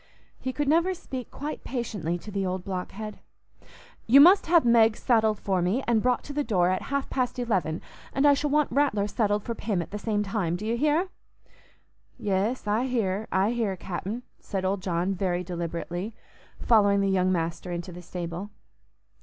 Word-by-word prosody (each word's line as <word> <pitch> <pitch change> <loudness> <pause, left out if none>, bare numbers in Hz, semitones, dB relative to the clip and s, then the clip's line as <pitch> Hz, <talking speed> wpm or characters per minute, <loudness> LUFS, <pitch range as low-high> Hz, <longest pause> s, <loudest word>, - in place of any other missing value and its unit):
He 260 - -3
could 290 +2 -2
never 340 +5 +3
speak 260 -7 -7
quite 295 +2 -6
patiently 205 -9 -3
to 210 +4 -10
the 200 -1 -1
old 185 -1 -2
blockhead. 200 +3 -5 0.9
"You 260 +5 +8
must 360 +6 +7
have 335 -3 +5
Meg 230 -2 +5
saddled 220 -4 +2
for 190 -3 0
me 195 +10 0
and 230 -2 +3
brought 250 +1 +1
to 290 - -7
the 295 +1 0
door 185 -7 +2
at 185 - -1
half 280 0 -1
past 255 -2 -1
eleven, 190 -10 -1 0.3
and 275 - +1
I 290 - +7
shall 290 +1 0
want 300 0 +2
Rattler 270 -8 +2
saddled 205 -1 0
for 235 - -3
Pym 210 -4 -2
at 170 - -5
the 210 - -4
same 210 -1 0
time. 195 -4 -1
Do 200 +4 -5
you 230 +2 0
hear?" 305 +8 +1 1.1
"Yes, 205 +5 -1
I 215 +4 +1
hear, 220 -4 -1
I 195 +4 +2
hear, 220 -6 -1
Cap'n," 195 +7 -5 0.2
said 190 -2 -4
old 190 0 0
John 180 +1 0
very 180 -1 -1
deliberately, 175 +3 -4 0.4
following 200 -3 +4
the 195 - +1
young 185 -1 +2
master 170 +1 -2
into 175 +1 -4
the 175 +1 -9
stable. 175 +2 -5
210 Hz, 185 wpm, -27 LUFS, 185-250 Hz, 1.1 s, You